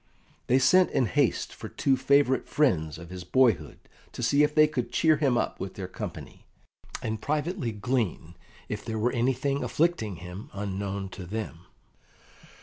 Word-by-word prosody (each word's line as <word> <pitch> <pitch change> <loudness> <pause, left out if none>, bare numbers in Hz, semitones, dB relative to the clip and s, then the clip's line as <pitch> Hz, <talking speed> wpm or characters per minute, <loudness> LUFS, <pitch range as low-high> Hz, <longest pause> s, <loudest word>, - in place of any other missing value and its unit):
They 125 - +4
sent 180 +8 +5
in 130 - +1
haste 140 +2 0
for - - -8
two 135 - +1
favourite 130 0 +3
friends 80 - +1
of 85 +2 -11
his 90 -1 -7
boyhood 90 - +2 0.4
to - - -5
see 140 - +3
if 150 0 +2
they 155 -1 +7
could 125 -5 -3
cheer 160 -2 +3
him 135 -5 +2
up - - -1
with - - -5
their - - -5
company, - - -8 0.6
and 110 -1 -3
privately 155 - -1
glean 105 -6 -2 0.3
if - - -5
there 110 -1 -4
were 120 +3 +1
anything 130 +3 0
afflicting 155 - 0
him 90 +4 -9
unknown 100 -1 -3
to 95 -1 -9
them. 90 -4 -6
120 Hz, 160 wpm, -27 LUFS, 100-140 Hz, 0.6 s, they